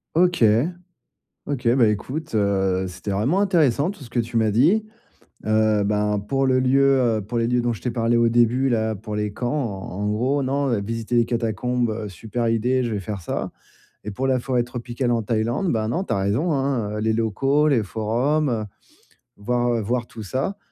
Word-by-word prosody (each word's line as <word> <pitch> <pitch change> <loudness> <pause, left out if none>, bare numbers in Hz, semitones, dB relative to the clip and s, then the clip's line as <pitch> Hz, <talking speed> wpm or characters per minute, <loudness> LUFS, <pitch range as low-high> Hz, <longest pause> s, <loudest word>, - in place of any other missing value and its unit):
OK. 175 -5 +3 1.0
OK, 130 -5 -1
bah 120 -4 +5
écoute, 130 +7 -3
heu, 95 -2 +1
c'était 90 +3 -7
vraiment 130 - +1
intéressant 165 -6 +2
tout 200 -7 -11
ce 120 - -14
que 120 - -2
tu 115 +1 -4
m'as 110 -1 +3
dit. 170 - +3 0.6
Heu, 110 -1 +3
ben 105 0 +1
pour 135 +6 0
le 130 0 +3
lieu, 135 +1 +4 0.2
heu, - - -2
pour 115 +4 -4
les 115 - +1
lieux 125 0 +2
dont 120 0 0
je 110 - -7
t'ai 125 - -1
parlé 115 0 +1
au 115 0 +4
début, 120 +3 +3
là, 110 -3 0
pour 105 +2 -7
les 105 -1 -2
camps, 120 +4 -3
en 110 -11 -3
en 105 - 0
gros, 130 +7 0
non, 135 -4 0
visiter 115 +3 -4
les 120 - +4
catacombes: 115 -1 -1
super 115 +5 -4
idée, 125 +3 +1
je 115 - -2
vais 105 - -2
faire 100 0 -5
ça, - - -3 0.5
et 105 - -5
pour 130 +7 -3
la 130 -1 +2
forêt 125 -1 0
tropicale 120 +1 -3
en 115 -1 +1
Thaïlande, 115 - 0
bah 110 -1 0
non, 170 +11 -1
tu - - -7
as - - 0
raison, 110 - 0
hein, 125 -7 -1
les 110 0 +1
locaux, 135 +7 +1
les 125 -7 +3
forums, 125 +9 0
heu, 110 -3 -1 0.7
voir 120 +2 0
voir 120 +3 -1
tout 110 -2 -9
ça. 135 - -3
120 Hz, 195 wpm, -23 LUFS, 110-130 Hz, 1.0 s, bah